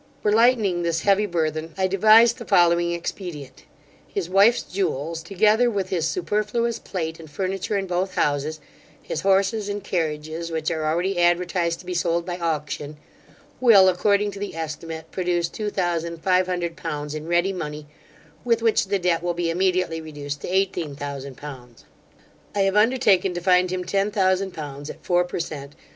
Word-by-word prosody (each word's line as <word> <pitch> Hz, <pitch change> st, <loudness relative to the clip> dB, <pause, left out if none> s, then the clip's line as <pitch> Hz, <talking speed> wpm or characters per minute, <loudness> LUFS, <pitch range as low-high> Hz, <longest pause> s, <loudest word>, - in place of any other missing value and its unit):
For 210 Hz, -, +2 dB
lightening 220 Hz, -5 st, +3 dB
this 170 Hz, -1 st, 0 dB
heavy 205 Hz, +1 st, +3 dB
burthen, 160 Hz, -2 st, -2 dB
I 190 Hz, -, +2 dB
devised 220 Hz, +5 st, +5 dB
the 235 Hz, -, -7 dB
following 175 Hz, -3 st, +3 dB
expedient. 170 Hz, -6 st, -6 dB, 0.4 s
His 180 Hz, -3 st, -4 dB
wife's 205 Hz, +5 st, +5 dB
jewels, 165 Hz, -4 st, -2 dB
together 210 Hz, +7 st, +3 dB
with 195 Hz, -4 st, -2 dB
his 170 Hz, -4 st, 0 dB
superfluous 230 Hz, -, -1 dB
plate 165 Hz, -3 st, -4 dB
and 160 Hz, -2 st, -11 dB
furniture 190 Hz, +5 st, -2 dB
in 195 Hz, -, -2 dB
both 185 Hz, +1 st, -2 dB
houses, 150 Hz, +2 st, 0 dB, 0.4 s
his -, -, -5 dB
horses 195 Hz, +2 st, +2 dB
and 205 Hz, 0 st, -4 dB
carriages, 160 Hz, -1 st, -3 dB
which 160 Hz, 0 st, -2 dB
are 160 Hz, -2 st, -2 dB
already 175 Hz, +4 st, 0 dB
advertised 175 Hz, -1 st, +1 dB
to -, -, -18 dB
be 180 Hz, -, -4 dB
sold 170 Hz, -1 st, 0 dB
by 180 Hz, -1 st, -4 dB
auction, 150 Hz, -2 st, -3 dB, 0.6 s
will, 215 Hz, -7 st, +7 dB
according 200 Hz, +3 st, +2 dB
to 200 Hz, -, -9 dB
the 205 Hz, -4 st, -5 dB
estimate, 160 Hz, 0 st, -6 dB
produce 175 Hz, -2 st, 0 dB
two 210 Hz, +3 st, -4 dB
thousand 170 Hz, -3 st, -2 dB
five 185 Hz, -1 st, +3 dB
hundred 175 Hz, -2 st, -2 dB
pounds 150 Hz, -1 st, -5 dB
in 155 Hz, +1 st, -6 dB
ready 175 Hz, +3 st, +2 dB
money, 150 Hz, -4 st, -5 dB, 0.6 s
with 230 Hz, -1 st, +1 dB
which 225 Hz, -2 st, +3 dB
the 200 Hz, +1 st, +1 dB
debt 175 Hz, -3 st, +1 dB
will 175 Hz, 0 st, -2 dB
be 170 Hz, -1 st, -1 dB
immediately 180 Hz, -2 st, 0 dB
reduced 145 Hz, -2 st, -6 dB
to -, -, -5 dB
eighteen 180 Hz, -5 st, 0 dB
thousand 140 Hz, -2 st, -6 dB
pounds 125 Hz, -5 st, -11 dB, 0.7 s
I 200 Hz, -, +2 dB
have 195 Hz, 0 st, +2 dB
undertaken 210 Hz, -5 st, +3 dB
to -, -, -1 dB
find 180 Hz, 0 st, +3 dB
him 185 Hz, 0 st, -2 dB
ten 195 Hz, +2 st, 0 dB
thousand 190 Hz, -2 st, +1 dB
pounds 145 Hz, -1 st, -7 dB
at -, -, -10 dB
four 175 Hz, 0 st, +3 dB
per 175 Hz, -, -5 dB
cent. 145 Hz, -4 st, -6 dB
175 Hz, 175 wpm, -23 LUFS, 160-195 Hz, 0.7 s, will